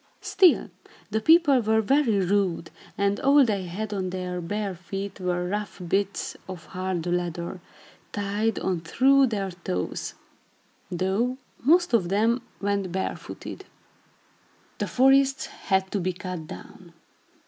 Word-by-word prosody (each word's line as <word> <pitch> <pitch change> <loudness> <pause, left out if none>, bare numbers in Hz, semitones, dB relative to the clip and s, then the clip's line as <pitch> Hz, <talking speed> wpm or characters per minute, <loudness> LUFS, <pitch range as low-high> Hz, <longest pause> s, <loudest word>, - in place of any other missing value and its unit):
Still, 365 -3 +4 0.4
the 220 - 0
people 315 -1 +6
were 220 0 +2
very 220 -4 +2
rude, 185 -4 0 0.3
and 200 0 +1
all 280 0 +5
they 200 -5 -1
had 205 +5 -4
on 190 -2 -2
their 180 -1 -4
bare 205 +3 -3
feet 195 +3 -6
were 180 -1 -1
rough 205 +1 -4
bits 195 +2 -1
of 180 -3 -7
hard 185 -2 -3
leather, 175 0 -2 0.5
tied 205 +2 -1
on 185 -3 -1
through 265 +10 +4
their 200 -4 -2
toes; 130 - -4 0.7
though 195 +8 0 0.2
most 345 +2 +3
of 190 -7 +3
them 225 +5 +2 0.2
went 200 -2 -1
barefooted. 190 +1 -5 1.1
The - - -1
forests 270 +1 +4
had 190 -1 -1
to 205 - 0
be 185 0 -1
cut 180 -3 -6
down. 175 -1 -11
200 Hz, 130 wpm, -26 LUFS, 180-225 Hz, 1.1 s, people